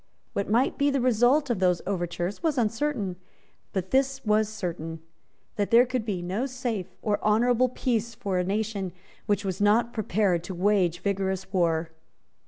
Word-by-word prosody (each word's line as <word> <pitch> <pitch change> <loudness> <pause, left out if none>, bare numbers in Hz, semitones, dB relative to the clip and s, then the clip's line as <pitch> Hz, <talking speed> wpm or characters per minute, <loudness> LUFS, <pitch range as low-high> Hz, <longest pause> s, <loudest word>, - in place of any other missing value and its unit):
What 200 - -2
might 240 +7 +2
be 285 0 +4
the 275 -1 +1
result 250 +3 +3
of 225 - -1
those 180 -2 +2
overtures, 175 0 -3
was 320 -4 0
uncertain; 225 -4 -1 0.5
but 190 -1 -3
this 270 0 +1
was 215 0 +3
certain, 165 -6 -5 0.6
that 205 -1 0
there 235 +2 +6
could 255 -3 -2
be 190 -5 -2
no 200 +9 -1
safe 245 -7 -3 0.2
or 205 -2 0
honourable 240 +4 +3
peace 235 -2 -1
for 195 -3 -1
a - - +1
nation 200 -1 -2 0.3
which 205 -1 +1
was 190 0 -3
not 225 +3 +3
prepared 200 -5 +1
to 185 - -5
wage 180 -2 +2
vigorous 190 -1 -2
war. 165 -3 +1
210 Hz, 165 wpm, -27 LUFS, 185-240 Hz, 0.6 s, there